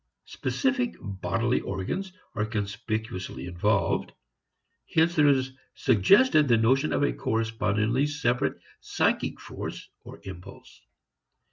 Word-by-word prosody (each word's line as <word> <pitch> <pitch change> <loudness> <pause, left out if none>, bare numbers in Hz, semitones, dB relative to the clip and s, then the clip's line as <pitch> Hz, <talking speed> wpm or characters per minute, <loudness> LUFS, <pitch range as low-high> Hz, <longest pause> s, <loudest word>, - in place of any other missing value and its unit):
Specific 260 -3 -1
bodily 100 +5 -1
organs 100 - -4 0.2
are 105 - -1
conspicuously 105 -2 -4
involved. 90 +1 0 0.8
Hence 165 +2 +3
there 150 -2 +5
is 130 -2 +2 0.2
suggested 150 - +4
the 115 -2 +4
notion 130 +7 +2
of - - +1
a - - +2
correspondingly 110 - 0
separate 135 -5 0 0.2
psychic - - 0
force - - -7 0.2
or - - -11
impulse. 95 +1 -11
115 Hz, 105 wpm, -27 LUFS, 100-145 Hz, 0.8 s, there